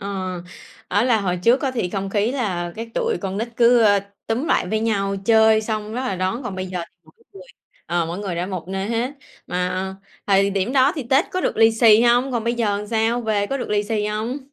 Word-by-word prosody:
Ờ, 190 -2 -4 0.5
á 205 +4 +2
là 230 -4 +3
hồi 180 -2 -1
trước 240 +2 +5
có 270 - 0
thì 230 -8 -2
không 195 -1 -3
khí 210 +3 +1
là 180 -10 -2
cái 230 +1 -6
tụi 465 -2 0
con 195 -1 -4
nít 230 +2 -2
cứ, 240 0 +5
ơ, 205 -2 +4 0.3
túm 245 +8 -1
lại - - +1
với 220 +1 0
nhau, 200 -3 0
chơi 220 0 +5
xong 215 -1 -4
rất 250 - -2
là 255 -8 -2
đón, 190 +8 -2
còn 210 -6 -5
bây 185 0 -4
giờ 180 -1 -4
thì - - -48
mỗi 160 - -22 0.2
người, 190 - -12 0.4
ờ, 170 -1 0
mỗi 170 +3 -5
người 195 -4 -4
đã 175 +2 -2
một 185 -3 -6
nơi 195 +1 -3
hết. 235 +3 -1 0.4
Mà 180 +1 -2 0.3
thời 195 0 +3
điểm 200 +5 -1
đó 270 +2 +4
thì 295 - -4
Tết 275 +7 +4
có 370 - -1
được - - -1
lì 225 0 +5
xì 225 0 +6
hông? 245 +2 +3
Còn 235 -2 -1
bây 235 +1 0
giờ 210 -3 -1
sao? 225 +2 +1
Về 210 -3 0
có 275 - -2
được 255 - -5
lì 205 -1 +2
xì 210 0 -1
hông? 220 +5 -3
215 Hz, 245 wpm, -21 LUFS, 195-235 Hz, 0.5 s, xì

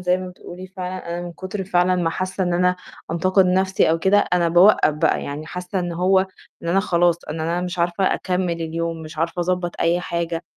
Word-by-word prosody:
زي 180 0 +2
ما 185 0 -6
بتقولي 180 0 -10
فعلًا 185 -1 -6
أنا 170 +1 -3
من 175 - -7
كتر 190 +3 -5
فعلًا 180 0 +2
ما 170 -2 0
حاسة 185 +2 -3
إن 175 - 0
أنا 180 +1 +2 0.3
أنتقد 185 +3 +3
نَفْسي 190 -1 +2
أو 165 - +2
كده 190 +4 +4
أنا 175 -1 +3
باوقّف 175 -2 +5
بقى، 155 +1 +1
يعني 145 +2 -6
حاسة 180 +3 -4
إن 175 -1 -2
هو 190 +2 +2 0.4
إن 170 - -4
أنا 190 +3 +3
خلاص 175 -3 +1
إن 160 +1 -4
أنا 170 +2 -1
مش 180 0 -4
عارفة 175 +3 +1
أكمّل 180 -1 -1
اليوم، 165 0 -3
مش 155 0 -10
عارفة 165 +2 -1
أضبَّط 180 0 -2
أي 170 +1 +2
حاجة، 170 -1 -3
180 Hz, 210 wpm, -21 LUFS, 170-185 Hz, 0.4 s, باوقّف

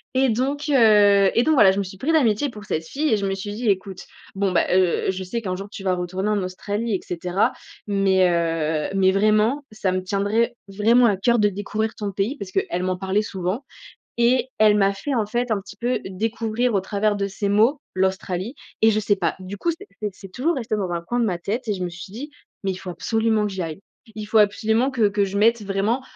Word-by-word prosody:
et 265 0 +3
donc 265 +6 -1
heu, 205 -6 +5
et 235 - +3
donc 315 - +3
voilà, 205 -8 +7
je 190 - -3
me - - 0
suis 190 0 -9
pris 275 +11 -1
d'amitié 280 -4 +2
pour 210 -4 -11
cette 160 -3 -2
fille 300 - -1
et - - +3
je 200 - -2
me 195 0 -1
suis 205 +1 -6
dit: 225 +1 -1
«Écoute, 190 -1 -2 0.3
bon, 195 -1 0
ben, 175 - +2
heu, 185 0 +2
je 190 0 -5
sais 230 +6 -4
qu'un 185 -4 -3
jour 195 +2 -7
tu 205 -2 -9
vas 185 -1 +1
retourner 185 +3 -3
en 210 -1 +1
Australie 205 +5 -3
et - - -2
cetera 180 +2 -1 0.3
mais 195 -2 +3
heu, 165 -2 0
mais 190 -1 +4
vraiment 215 +7 +2
ça 210 -3 -1
me 185 0 -1
tiendrait 205 +5 0
vraiment 220 +5 +3
à 205 -4 +3
cœur 235 +5 +2
de 210 -1 +4
découvrir 210 +3 -3
ton 205 -2 -4
pays» 200 +9 -2
parce 195 -7 -7
qu'elle 180 -1 -1
m'en 185 0 -1
parlait 190 +2 0
souvent 195 +5 -4 0.5
et 250 +2 +2
elle 215 -1 +5
m'a 195 -1 +3
fait, 265 +8 -4
en 225 -4 +1
fait, 240 +3 -2
un 215 -2 +1
petit 195 +1 -13
peu 245 +3 -1
découvrir 225 +4 -1
au 195 - +3
travers 205 +2 0
de 200 -1 -1
ses 200 +1 -3
mots 225 +8 +3
l'Australie 190 +3 -1 0.3
et 220 - +7
je 215 0 +1
sais 205 -1 +1
pas 190 - -1
du 185 +2 -7
coup, 340 - 0
c'est 335 +5 -8 0.2
c'est 210 - -1
c'est 195 - -12
toujours 320 - 0
resté 230 -4 -2
dans 190 -4 -2
un 170 - -1
coin 240 +8 -2
de - - +2
ma 180 -4 -1
tête 220 +7 -4
et 210 - +1
je 185 - -5
me 175 - -3
suis 180 +2 -10
dit: 275 +8 -7 0.3
«Mais 195 - 0
il - - -7
faut 185 0 -7
absolument 220 +3 0
que 205 - -4
j'y 190 -1 -3
aille. 165 +1 -6 0.4
Il 215 - -4
faut 220 +1 +3
absolument 220 +4 +2
que 235 -6 +2
que 200 0 +1
je 195 0 -4
mette 230 +2 +3
vraiment 205 +6 -1
205 Hz, 245 wpm, -22 LUFS, 190-230 Hz, 0.5 s, voilà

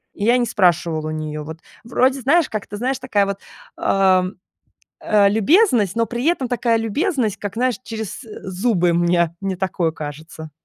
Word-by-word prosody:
И 205 - -3
я 240 +2 +4
не 240 - +1
спрашивала 170 -6 +1
у - - -3
неё. 155 -1 -4
Вот 160 +2 -8 0.3
вроде, 255 +3 +1
знаешь, 315 +5 +3
как 215 -2 -5
ты 205 - -7
знаешь, 260 +3 -1
такая 210 -6 +1
вот, 200 0 -4 0.4
э, 190 -1 +3 0.8
э, 205 -2 +3
любезность, 225 - +3
но 230 0 +2
при 240 +4 -4
этом 280 -8 +1
такая 235 -2 +1
любезность, 225 - -1
как, 205 -1 -6
знаешь, 250 0 +1
через 220 -2 -6 0.3
зубы, 185 -3 +1
мне 170 -1 +2
мне 190 -1 -2
такое 180 -3 -1
кажется. 155 +1 -8
205 Hz, 170 wpm, -20 LUFS, 175-245 Hz, 0.8 s, я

